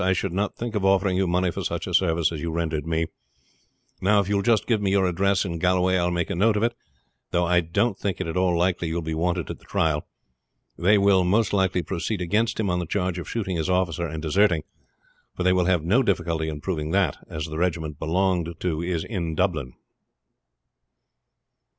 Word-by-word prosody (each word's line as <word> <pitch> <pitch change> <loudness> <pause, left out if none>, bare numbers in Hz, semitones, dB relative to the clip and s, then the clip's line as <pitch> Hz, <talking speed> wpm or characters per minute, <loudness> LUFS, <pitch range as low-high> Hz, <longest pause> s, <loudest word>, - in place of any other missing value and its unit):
I 95 0 +3
should 95 -1 -2
not 100 +2 -1
think 120 -1 -4
of 105 -3 -1
offering 95 -1 +3
you 95 0 +1
money 90 +1 +1
for - - -5
such - - -3
a - - -5
service 85 -3 +2
as 80 -3 -5
you 85 - -2
rendered 80 -2 -2
me. 80 0 0 1.0
Now, 105 +2 +4
if 100 - 0
you 105 - -1
will - - +1
just 110 +1 +2
give 110 -4 +1
me 100 - +1
your 95 -1 +3
address 95 +3 +1
in 85 -2 -4
Galway 90 +2 +2
I 90 - +2
will - - +1
make 85 -1 -1
a - - -1
note 105 +4 +3
of 105 - 0
it; 120 0 +1 0.6
though 90 0 +1
I 90 +1 +3
don't 90 +6 0
think 100 -3 -2
it 95 - -2
at 80 - -4
all 90 -2 +2
likely 90 0 +1
you 80 - -3
will 85 - -2
be 80 0 -3
wanted 85 -1 -1
at - - -8
the - - -22
trial. 80 -6 0 0.7
They 100 +5 +4
will 100 -2 +4
most 105 +4 +2
likely 95 -2 +1
proceed 95 +4 -3
against 105 +7 0
him 110 - 0
on 90 -1 0
the 85 - -4
charge 90 0 -1
of 85 - -7
shooting 95 -6 -2
his 80 +2 -2
officer 90 -2 0
and 80 0 -6
deserting; 85 0 +2 0.7
for 90 - -2
they 90 0 +4
will 90 -1 +2
have 90 -3 +2
no 100 +11 +3
difficulty 85 -7 0
in 75 -1 -6
proving 75 -4 -3
that, 95 -4 +1
as 75 -1 -4
the 80 0 -5
regiment 80 -4 -1
he - - -4
belonged 90 -1 0
to 85 -3 -1
is 85 -2 -2
in 85 -7 -3
Dublin." 80 -8 -1
90 Hz, 230 wpm, -24 LUFS, 85-95 Hz, 1.0 s, Now